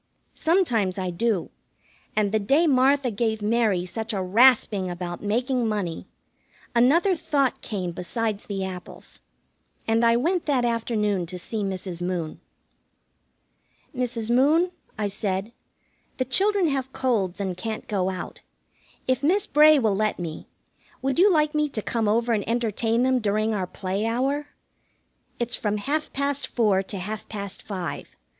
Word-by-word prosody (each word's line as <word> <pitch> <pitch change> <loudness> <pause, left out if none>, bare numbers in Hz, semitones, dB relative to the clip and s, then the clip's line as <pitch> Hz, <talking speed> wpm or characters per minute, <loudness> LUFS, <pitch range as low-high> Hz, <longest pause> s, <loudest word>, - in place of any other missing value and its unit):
Sometimes 245 - +1
I 185 -1 -2
do, 205 0 -1 0.6
and 210 -2 +2
the 220 - +2
day 275 +11 +3
Martha 270 -2 +3
gave 220 +1 -1
Mary 210 -5 +2
such 220 +5 -4
a 195 - -1
rasping 210 -2 +4
about 175 -1 -5
making 245 +3 0
money, 200 -6 -3 0.7
another 315 +11 +4
thought 285 -5 0
came 185 -5 -3
besides 210 +4 -3
the 195 -2 -2
apples, 185 -1 -9 0.7
and 225 +1 +2
I 230 0 +5
went 335 +7 0
that 260 -4 +2
afternoon 210 -6 0
to 180 +2 -6
see 215 +4 -4
Mrs. 185 -2 -4
Moon. 175 -3 -3 1.5
"Mrs. 235 -2 -2
Moon," 310 +8 +4 0.3
I 210 -1 0
said, 200 +1 -3 0.7
"the 255 - 0
children 390 +7 +3
have 265 -2 -2
colds 220 -10 0
and 190 -2 -2
can't 215 +4 -5
go 190 -3 0
out. 185 -1 -6 0.7
If 255 0 +1
Miss 360 +7 +2
Bray 305 +1 +6
will 220 -7 +2
let 215 +1 0
me, 165 -3 -6 0.6
would 270 +3 0
you 395 +3 +6
like 305 -2 +2
me 300 -1 +1
to 220 - -3
come 225 -3 -1
over 230 +3 +2
and 210 -2 0
entertain 230 0 +1
them 260 0 +3
during 215 0 0
our 190 -3 -2
play 195 +4 -3
hour? 270 +5 0 0.9
It's 240 0 0
from 210 -1 -1
half 290 +8 -2
past 280 0 -1
four 210 -5 +2
to 195 +1 -6
half 210 +3 -5
past 200 -3 -6
five. 185 -4 -6
225 Hz, 150 wpm, -25 LUFS, 195-260 Hz, 1.5 s, Bray